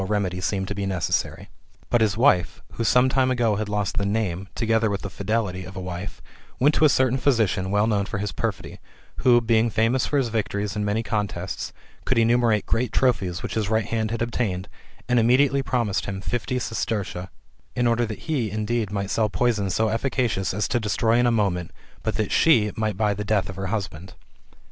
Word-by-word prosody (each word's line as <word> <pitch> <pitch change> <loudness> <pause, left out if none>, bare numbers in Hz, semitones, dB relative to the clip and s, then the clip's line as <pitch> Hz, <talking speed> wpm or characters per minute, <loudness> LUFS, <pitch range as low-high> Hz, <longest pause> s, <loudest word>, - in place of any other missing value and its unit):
remedy 95 -3 -1
seemed 95 +1 -1
to 100 - -3
be 100 -1 -3
necessary. 90 -5 -1 0.4
But 120 - +3
his 110 -2 +2
wife, 90 -9 +3
who 115 - -3
some 125 +3 +4
time 130 0 +2
ago 120 -5 +1
had 105 0 -3
lost 105 -1 -2
the 100 - +1
name, 95 -3 -1
together 115 -1 +1
with 100 -1 -3
the 100 - -5
fidelity, 100 -3 -2
of 95 +1 -10
a - - -5
wife, 90 +1 -6 0.4
went 145 +4 +4
to 155 - +4
a - - +6
certain 130 -1 +2
physician, 110 -8 +1
well 105 +1 +2
known 105 -3 +1
for 115 - -4
his 100 -1 -3
perfidy, 80 - -4 0.4
who, 120 -2 +5
being 115 0 +2
famous 115 +4 +1
for 145 - 0
his 130 -4 +1
victories 105 -2 -2
in 105 - -1
many 105 +2 0
contests, 100 -4 -3 0.3
could - - 0
enumerate 115 -2 +3
great 115 0 0
trophies 95 -9 0
which - - -4
his 105 -2 -1
right 110 -1 +1
hand 110 -1 -1
had 115 +1 -1
obtained,^^ 105 -5 -2 0.4
and 125 -1 +3
immediately 130 +4 +3
promised 120 -7 -1
him 95 -1 -4
fifty 120 +5 -2
sestertia,^' 105 -6 -3 0.5
in 120 - +1
order 120 0 +2
that 110 -2 -5
he 135 -9 0
indeed 110 +1 -1
might 100 -1 -3
sell 110 -2 +1
poison 105 -3 0
so 110 +4 +1
efficacious 115 -4 0
as 100 +1 -1
to 120 - 0
destroy 110 +2 +1
in 120 - +3
a - - +3
moment, 95 -6 0 0.3
but - - -2
that - - -1
she 115 -10 +4
might 110 -3 -1
buy 105 -1 +2
the 105 +1 -4
death 105 -2 0
of 95 - -6
her 95 0 -4
husband. 95 -3 -4
110 Hz, 205 wpm, -24 LUFS, 100-120 Hz, 0.5 s, a